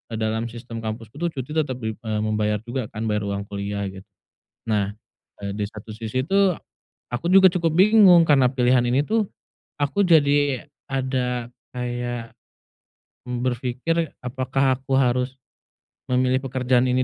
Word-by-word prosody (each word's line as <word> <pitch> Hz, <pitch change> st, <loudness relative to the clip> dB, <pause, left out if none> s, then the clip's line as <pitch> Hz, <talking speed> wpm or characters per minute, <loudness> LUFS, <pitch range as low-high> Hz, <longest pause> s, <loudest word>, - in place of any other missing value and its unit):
dalam, 110 Hz, +1 st, -1 dB
eee, 115 Hz, -, -11 dB
sistem 115 Hz, -1 st, -7 dB
kampusku 110 Hz, +3 st, -6 dB
tuh 175 Hz, -, 0 dB
cuti 130 Hz, +1 st, -5 dB
tetap 150 Hz, -4 st, 0 dB
dim 110 Hz, 0 st, -3 dB
eee, 110 Hz, -2 st, -2 dB
membayar 105 Hz, -1 st, 0 dB
juga 120 Hz, -1 st, -4 dB
kan, 110 Hz, -, -6 dB
bayar 105 Hz, -1 st, -1 dB
uang 100 Hz, 0 st, -2 dB
kuliah 100 Hz, 0 st, -3 dB
gitu. 95 Hz, 0 st, -12 dB, 0.6 s
Nah, 105 Hz, -2 st, 0 dB, 0.5 s
eee, 100 Hz, -, -3 dB
di 105 Hz, 0 st, -2 dB
satu 110 Hz, 0 st, -10 dB
sisi 115 Hz, +4 st, -3 dB
tuh 195 Hz, 0 st, +3 dB, 0.6 s
aku 125 Hz, +8 st, -2 dB
juga 190 Hz, 0 st, +8 dB
cukup 170 Hz, -3 st, 0 dB
bingung, 190 Hz, -3 st, +7 dB
karena 135 Hz, -4 st, +5 dB
pilihan 125 Hz, -1 st, +3 dB
ini 130 Hz, +4 st, +2 dB
tuh 220 Hz, -2 st, +1 dB, 0.5 s
aku 145 Hz, +8 st, +2 dB
jadi 145 Hz, -4 st, +3 dB, 0.2 s
ada 125 Hz, -2 st, -1 dB, 0.2 s
kayak, 120 Hz, -1 st, -4 dB, 0.9 s
mmm, 125 Hz, -, -2 dB
berfikir 130 Hz, +6 st, -1 dB
apakah 130 Hz, +1 st, 0 dB
aku 135 Hz, 0 st, 0 dB
harus 125 Hz, 0 st, +1 dB, 0.7 s
memilih 130 Hz, 0 st, +2 dB
pekerjaan 130 Hz, -1 st, +1 dB
ini 125 Hz, +1 st, +2 dB
125 Hz, 150 wpm, -23 LUFS, 110-140 Hz, 0.9 s, juga